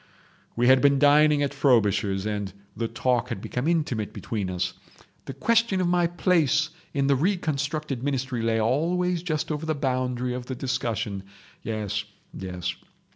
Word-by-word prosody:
We 120 - +1
had 130 +1 +6
been 140 -1 +5
dining 145 +1 +5
at 140 - -1
Frobisher's, 105 -8 +2
and 105 -2 -2 0.2
the 115 +1 -2
talk 120 0 0
had - - -3
become 125 +7 -3
intimate 150 -11 0
between 105 -5 -3
us. 90 0 -2 0.5
The - - -6
question 230 -4 +2
of 180 - +1
my 175 -1 +3
place 165 -3 +2 0.2
in 140 -1 0
the 140 0 +4
reconstructed 150 -4 -1
ministry 130 -3 -2
lay 115 0 +1
always 170 +9 +1
just 160 -3 -2
over 155 +1 -3
the 155 - 0
boundary 125 -2 -1
of 125 0 -6
the 130 - -4
discussion. 115 -6 -2 0.4
Yes—yes. 100 -4 -5
130 Hz, 150 wpm, -26 LUFS, 110-155 Hz, 0.5 s, had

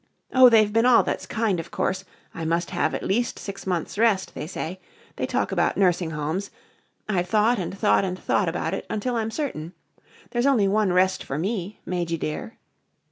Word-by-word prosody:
Oh, 260 -1 +8
they've 215 -3 +4
been 225 +2 +4
all 250 - +6
that's - - -3
kind, 220 -6 0
of 165 +1 -6
course 190 0 -2 0.3
I 165 - -6
must 170 +2 -1
have 175 -3 0
at - - -4
least 235 +5 0
six 200 -1 -7
months' 180 +2 -2
rest, 220 -5 +2
they 150 - -5
say 180 +1 -5 0.4
they - - -2
talk - - -1
about - - +1
nursing 180 -3 +2
homes 160 +6 -3 0.6
I've 180 -4 0
thought 220 +3 +3
and 185 +2 -4
thought 205 0 +3
and 185 -1 -2
thought 185 0 +1
about 175 +3 -2
it 195 - -4
until 240 +4 -2
I'm 225 -1 -1
certain. 190 - -4 0.6
There's 240 +2 +1
only 235 -8 +4
one 205 -1 +2
rest 185 +1 +2
for 135 - -4
me, 195 +3 -3
Majy 175 -2 -2
dear." 155 +10 -5
190 Hz, 190 wpm, -24 LUFS, 175-220 Hz, 0.6 s, Oh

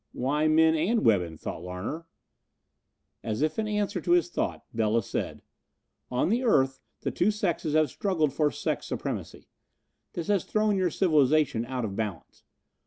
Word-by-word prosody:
"Why 150 +5 +1
men 160 +1 +5
and 185 +9 +1
women?" 90 -7 +2
thought - - -6
Larner. 90 - -5 1.2
As 110 +5 -1
if 155 +7 0
in 215 - 0
answer 205 -3 -1
to 175 - +2
his 175 0 +3
thought - - -3
Bela 115 0 +1
said: - - -4 0.7
"On 125 +6 +1
the 240 +5 +1
earth 135 - +3 0.2
the - - -2
two 180 - +2
sexes 175 -7 -1
have 155 -4 +3
struggled 160 -8 0
for 150 0 +2
sex - - -3
supremacy. - - -5 0.7
This 170 - -4
has 200 -2 +1
thrown 215 -1 +1
your 185 -2 +2
civilization 150 - +2
out 130 -2 -2
of 100 -2 -5
balance. 105 -5 -5
155 Hz, 160 wpm, -27 LUFS, 120-185 Hz, 1.2 s, men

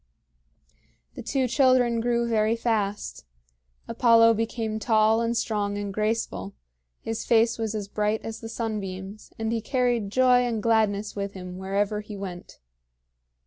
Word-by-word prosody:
The - - -8
two 265 -2 0
children 250 -2 +3
grew 235 0 +1
very 220 -1 +2
fast. 210 - -2 0.6
Apollo 230 -1 +5
became 225 -1 -2
tall 220 0 +3
and 235 0 0
strong 205 -3 -1
and 205 -1 -4
graceful; 210 - -2 0.5
his 225 0 -4
face 230 0 +3
was 220 -1 -2
as 205 -2 -4
bright 210 +1 -1
as 225 0 -6
the 225 - -8
sunbeams; 205 -3 -5
and 225 0 -2
he 225 - -1
carried 245 -4 0
joy 250 +2 +4
and 235 -4 -1
gladness 215 -2 +1
with 200 -1 -4
him 180 -1 -8
wherever 200 +2 -1
he 210 -1 -9
went. 185 -3 -8
220 Hz, 145 wpm, -25 LUFS, 205-230 Hz, 0.6 s, Apollo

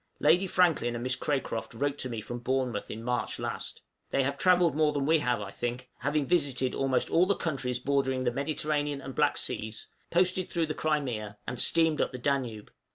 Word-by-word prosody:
Lady 175 +6 +4
Franklin 170 -10 +2
and 120 - -4
Miss 130 0 0
Cracroft 130 -6 -2
wrote 140 +3 -1
to 130 - -3
me 115 -2 -4
from 120 +3 -6
Bournemouth 125 -3 -1
in 110 +1 -6
March 125 0 -1
last. - - -5 0.3
They 135 - +2
have 140 +2 -1
travelled 175 -2 +4
more 155 -1 +3
than 140 -1 0
we 160 +2 +4
have, 125 -5 0
I 100 -1 -6
think, 120 +3 -4
having 145 +1 0
visited 135 -5 +1
almost 135 -2 0
all 175 +2 +4
the 200 - +3
countries 135 -6 -2
bordering 130 0 0
the 120 - +1
Mediterranean 145 +1 -1
and 135 -1 -7
Black - - +2
Seas, 110 0 -2 0.2
posted 180 +1 +2
through 170 -2 0
the 155 - -3
Crimea, 125 -11 -2
and 125 - -4
steamed 160 0 +4
up - - -1
the - - -4
Danube! 125 -5 -2
135 Hz, 200 wpm, -29 LUFS, 125-155 Hz, 0.3 s, Lady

